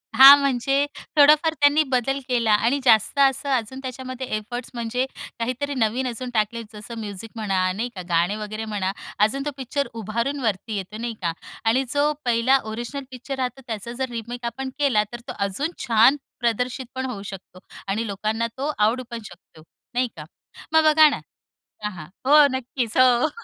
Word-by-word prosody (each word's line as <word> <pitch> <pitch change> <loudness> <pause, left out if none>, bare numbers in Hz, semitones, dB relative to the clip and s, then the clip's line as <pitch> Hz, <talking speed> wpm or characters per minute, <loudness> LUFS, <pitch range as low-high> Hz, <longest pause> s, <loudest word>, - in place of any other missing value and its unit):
हां, 270 +3 +11
म्हणजे 275 +1 +1 0.3
थोडाफार 300 +2 +6
त्यांनी 290 0 +4
बदल 265 +2 +1
केला 235 -4 +1
आणि 230 +7 +2
जास्त 225 +3 +4
असं 275 0 +3
अजून 260 0 -1
त्याच्यामध्ये 255 0 -6
एफर्ट्स 240 +3 -6
म्हणजे 240 +2 -1 0.3
काहीतरी 255 +5 -2
नवीन 250 +2 0
अजून 250 +1 -5
टाकले, 220 +1 0
जसं 215 +2 -8
म्युझिक 210 0 -7
म्हणा, 190 -4 0
नाही 235 +4 -2
का? 185 - -5
गाणे 170 +4 +2
वगैरे 215 +1 -5
म्हणा, 205 -3 -2 0.3
अजून 235 +7 +2
तो 295 - -1
पिक्चर 270 +1 -2
उभारून 230 +6 -2
वरती 220 -2 -2
येतो, 195 +2 -6
नाही 235 +1 -4
का? 170 -2 0 0.3
आणि 240 +4 +3
जो 290 +1 +3
पहिला 240 +3 +4
ओरिजिनल 240 +5 -5
पिक्चर 255 +2 -6
राहतो, 255 0 -3
त्याचा 225 0 -5
जर 260 0 -2
रिमेक 240 +1 -6
आपण 265 +3 -4
केला 260 -8 +3
तर 240 - -6
तो - - -4
अजून 280 - -2 0.2
छान 230 +4 +6 0.2
प्रदर्शित 250 +2 -1
पण 260 0 -2
होऊ 210 -6 -5
शकतो 195 -2 -10 0.3
आणि 215 +4 -1
लोकांना 215 +3 -1
तो 285 +3 -1
आवडू 225 +5 +2
पण 235 - -4
शकतो, 175 -4 -15 0.3
नाही 250 +1 +1
का? 150 - -8 0.5
मग 320 0 +6
बघा 310 0 +7
ना 285 - -3 0.6
हां, 210 - -2
हां. 155 -4 -9 0.2
हो, 295 +2 +7
नक्कीच 245 -2 -3
हो. 255 +3 +5
240 Hz, 175 wpm, -23 LUFS, 215-270 Hz, 0.6 s, हां